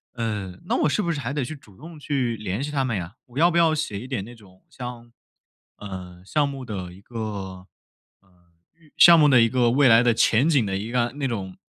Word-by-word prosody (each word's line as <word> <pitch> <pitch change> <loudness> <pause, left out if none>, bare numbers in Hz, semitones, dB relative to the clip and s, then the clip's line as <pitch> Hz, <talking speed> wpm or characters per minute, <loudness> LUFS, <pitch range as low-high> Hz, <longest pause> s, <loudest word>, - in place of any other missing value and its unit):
呃， 105 -6 -4
那 - - +1
我 - - +4
是 155 - 0
不 170 - -1
是 155 - -3
还 135 0 -4
得 145 -2 -1
去 140 +6 -6
主 110 -9 -19
动 160 - -12
去 130 -5 -2
联 105 +3 -4
系 145 - -4
他 140 -3 -1
们 120 -4 -2
呀？ 90 +2 -6
我 125 +3 -7
要 170 +2 +5
不 170 - 0
要 165 -2 +4
写 150 -10 -3
一 125 - -9
点 125 -7 -3
那 120 +4 -11
种 95 -4 -20
像， 120 -2 -9 0.7
呃， 90 -3 -9
项 145 +9 0
目 135 -2 -6
的 95 -6 -6
一 95 - -15
个， 115 +3 -11
呃， 95 -4 -6 1.1
预 155 -3 -24
项 170 -1 +8
目 150 -1 +5
的 130 -4 +6
一 115 - +4
个 120 0 +2
未 140 +1 +4
来 115 -1 +7
的 120 -1 +3
前 115 +5 +3
景 140 -8 +3
的 95 -2 -2
一 110 +4 -6
个 125 +2 -1
那 140 - -1
种 95 -7 -5
120 Hz, 255 characters per minute, -24 LUFS, 100-140 Hz, 1.1 s, 项